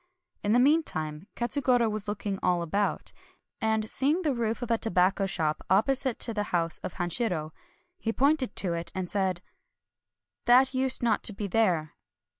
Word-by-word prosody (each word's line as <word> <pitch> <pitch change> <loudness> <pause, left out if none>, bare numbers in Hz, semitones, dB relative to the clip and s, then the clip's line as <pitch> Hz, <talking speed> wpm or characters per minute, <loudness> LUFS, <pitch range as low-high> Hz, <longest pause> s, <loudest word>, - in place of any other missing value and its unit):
In 205 - +2
the 245 - +5
mean 295 +6 +5
time, 155 - -5
Katsugoro 245 -1 +2
was 215 -1 -3
looking 205 -1 -3
all 175 -1 +1
about; 200 +5 -1 0.5
and 220 -1 +1
seeing 295 +10 +1
the 300 -4 +1
roof 230 0 -2
of 235 - -3
a 230 - +3
tobacco 195 -1 +2
shop 155 -4 -1
opposite 255 +6 +2
to 230 - +1
the 210 -1 -1
house 165 -2 +1
of - - -6
Hanshiro, 175 -3 -1 0.5
he 225 - -1
pointed 275 -1 +1
to 180 -3 +1
it, 170 0 -3
and 185 -1 -3
said: 185 -2 -1 0.3
— - - -63
" - - -60
That 255 +2 +5
used 260 -1 -1
uot 225 -3 +2
to 210 - 0
be 205 +1 -4
there." 180 -7 +1
215 Hz, 180 wpm, -28 LUFS, 180-245 Hz, 0.5 s, the